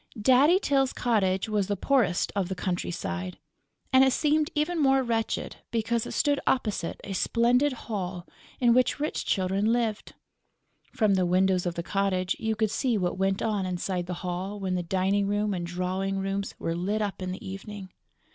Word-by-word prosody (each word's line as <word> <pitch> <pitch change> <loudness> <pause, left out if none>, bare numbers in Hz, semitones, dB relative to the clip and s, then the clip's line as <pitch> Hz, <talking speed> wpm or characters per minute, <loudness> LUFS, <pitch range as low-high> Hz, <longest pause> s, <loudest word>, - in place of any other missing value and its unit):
Daddy 265 - +5
Tyl's 275 -8 +1
cottage 195 -6 +1
was 210 -3 0
the 205 - 0
poorest 210 -6 +1
of 195 -3 0
the 190 - -2
countryside; 170 - -3 0.6
and 260 0 +7
it 265 - +4
seemed 305 0 +2
even 310 +2 0
more 270 -1 +4
wretched 230 -2 -2
because 230 0 -1
it - - -6
stood 285 -1 +2
opposite 215 -9 0
a 200 - -5
splendid 245 +8 +2
hall 190 -7 -5 0.3
in 240 -2 +5
which 255 +2 +2
rich 300 - -2
children 195 +3 +1
lived. 230 -3 -1 0.8
From 215 -3 +2
the 185 -1 +2
windows 185 0 +2
of 175 - -2
the 170 - -3
cottage 190 -1 0
you 220 0 -1
could 215 -1 0
see 240 0 +1
what 180 -1 -1
went 195 0 +1
on 210 -3 0
inside 180 0 -2
the 180 - -3
Hall 185 +3 -3
when 190 -2 -2
the 180 - 0
dining 190 +3 +1
room 205 0 0
and 175 -2 -3
drawing 185 +2 -2
rooms 195 +1 -3
were 165 - -2
lit 205 +5 -1
up 200 -2 -4
in 185 0 -3
the 185 - -7
evening. 195 0 -8
200 Hz, 180 wpm, -27 LUFS, 185-235 Hz, 0.8 s, and